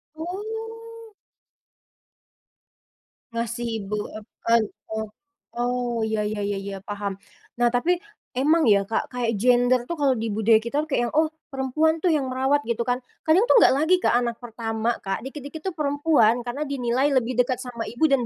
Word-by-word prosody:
Oh. 445 +5 -7 2.2
Ngasih 235 +1 -3
ibu, 205 +1 -4 0.2
ep 210 - -12 0.2
en 230 -1 +6 0.3
oh. 220 0 -2 0.5
Oh 245 -1 -1
ya 220 -1 0
ya 210 0 -2
ya 195 -1 -3
paham. 205 -1 -4 0.5
Nah, 240 - +5
tapi 340 +10 +1 0.3
emang 305 +5 +3
ya 200 -3 +5
Kak, 225 - 0
kayak 230 -3 -1
gender 245 0 +4
tuh 340 - -3
kalau 270 -2 +3
di 225 +1 -2
budaya 220 +1 +4
kita 235 +7 -1
tuh 310 - -7
kayak 270 - +1
yang, 235 - -5
oh 310 +1 +3 0.2
perempuan 310 +5 +1
tuh 360 - +2
yang 300 -4 +2
merawat 265 +2 +1
gitu 235 0 -1
kan, 245 +1 0 0.2
kadang 345 +8 +4
tuh - - +4
enggak - - +7
lagi 320 +5 +4
ke - - +3
anak 240 0 0
pertama 225 0 -2
Kak, 195 +2 -2
dikit-dikit 285 +4 -8
itu 380 +3 -2
perempuan 285 -5 +3
karena 255 +5 -4
dinilai 270 +1 0
lebih 250 -1 +1
dekat 250 +1 +1
sama 235 -3 -5
ibu 240 +7 -9
dan 265 -3 +2
245 Hz, 170 wpm, -24 LUFS, 230-295 Hz, 2.2 s, enggak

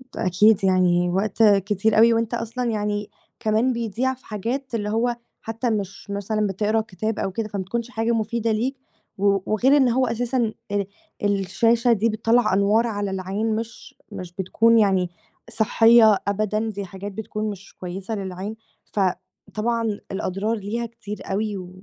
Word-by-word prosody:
ده - - -2
أكيد 200 +3 +4
يعني 180 -2 +3
وقت 200 +4 +1
كتير 205 +1 +3
أوي 230 +1 +7
وأنت 230 0 0
أصلًا 235 +1 -2
يعني 210 -1 -2 0.3
كمان 220 +4 +2
بيضيع 235 +3 -1
في 260 - -18
حاجات 235 +5 -3
اللي 210 -2 -2
هو 235 +3 +1 0.3
حتى 225 +2 -2
مش 200 -2 -4
مثلًا 205 +1 -1
بتقرا 210 +3 0
كتاب 215 +1 -4
أو 195 - -1
كده، 215 +3 -3
فما 200 -2 -4
بتكونش 235 +5 -3
حاجة 225 -1 -1
مفيدة 230 0 0
ليك 240 +5 0 0.4
و 200 0 +3 0.2
وغير 260 +7 +4
إن 265 -3 +4
هو 255 +2 +2
أساسًا 235 0 0 0.2
أ 205 -1 0 0.4
الشاشة 205 +4 +2
دي 225 +1 +1
بتطلّع 225 0 +2
أنوار 205 +4 +3
على 205 -3 -2
العين 195 +4 -2
مش 230 +1 -7 0.2
مش 185 -3 -7
بتكون 225 +5 +3
يعني 190 -4 +2 0.4
صحيّة 225 -1 +5
أبدًا، 215 +2 0
دي 200 -2 -5
حاجات 195 +2 -7
بتكون 215 +1 -4
مش 200 -1 -9
كويسة 190 +4 -5
للعين، 195 +1 -5 0.4
ف - - -1 0.5
طبعًا 230 +2 0 0.3
الأضرار 195 +3 -1
ليها 220 +3 -3
كتير 225 -3 -8
أوي 210 +1 -1
و 180 -1 -8
215 Hz, 160 wpm, -23 LUFS, 200-230 Hz, 0.5 s, أوي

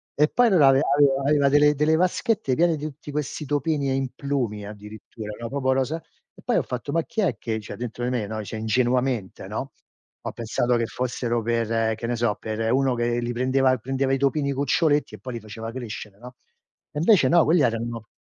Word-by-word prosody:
E 150 +1 +4
poi, 245 -1 +4
l'aveva 140 -8 +5
aveva 140 -2 +4
aveva 145 -2 +4
delle 150 +1 +5
delle 150 +2 +3
vaschette 185 - +1
piene 170 0 +3
di 150 - -6
tutti 150 0 -8
questi 150 +1 -3
topini 145 0 0
e - - +1
implumi 130 -5 -2
addirittura, 105 +1 -9
no, 115 -1 -5
proprio 135 -1 0
rosa 135 +5 -1 0.4
e - - -16
poi - - +1
ho - - +3
fatto: 125 +3 -5
"Ma 165 +2 +2
chi 220 - -3
è 165 - +1
che" 110 -1 -3
cioè, 105 - -8
dentro 120 0 -5
di 125 - 0
me, 110 -5 -1
no, 110 0 -4
cioè 110 - -6
ingenuamente, 120 -1 0
no, - - -5 0.5
ho - - -4
pensato 120 +1 0
che 115 -1 -1
fossero 120 -1 -2
per 115 -1 0
che 115 +1 -5
ne 120 - -1
so 115 -3 0
per 110 +1 -2
uno 135 -2 +2
che 120 0 0
li 120 0 -2
prendeva 130 +1 +2
prendeva 135 +3 -1
i - - +2
topini 140 +1 +1
cuccioletti. 145 +2 +1
E - - -15
poi, 125 -2 -7
li 115 - -4
faceva 110 +1 -7
crescere, 110 -5 -7
no, 125 +1 -11 0.6
e - - -8
invece 170 - +5
no, 170 -1 +5
quelli 160 +1 +4
erano 115 -2 -1
130 Hz, 210 wpm, -24 LUFS, 115-145 Hz, 0.6 s, l'aveva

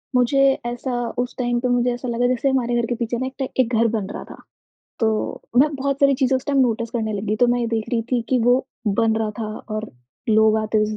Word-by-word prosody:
मुझे 250 +2 +3 0.3
ऐसा 245 +2 -3 0.3
उस 245 0 -2
टाइम 240 -1 0
पे 250 - -1
मुझे 245 0 +2
ऐसा 245 +1 -6
लगा 240 +1 +1
जैसे 255 +2 +1
हमारे 245 -3 +1
घर 235 -1 +1
के 240 - -2
पीछे 235 0 -2
ना 260 - -2
एक 260 - -8
ट 265 - 0
एक 250 -1 +2
घर 230 +1 +4
बन 215 -4 -2
रहा - - -6
था, - - -11 0.6
तो 220 -2 -1 0.2
मैं 285 +4 +6
बहुत 275 0 -2
सारी 275 -1 +5
चीज़ों 265 0 +2
उस 260 - -6
टाइम 285 -2 +1
नोटिस 230 -3 +1
करने 220 -2 -2
लग 200 0 -3
गई, 215 +1 0
तो 245 +2 +4
मैं 245 0 +1
ये 235 - 0
देख 225 -1 -2
रही 230 -1 +1
थी 245 - +3
कि 260 - +2
वो 245 +2 +3 0.3
बन 225 -1 +3
रहा 220 -1 -1
था 225 - -2 0.3
और 215 0 -4 0.4
लोग 220 0 +4
आते 215 0 0
उसे 215 0 -2
240 Hz, 255 wpm, -22 LUFS, 225-255 Hz, 0.6 s, मैं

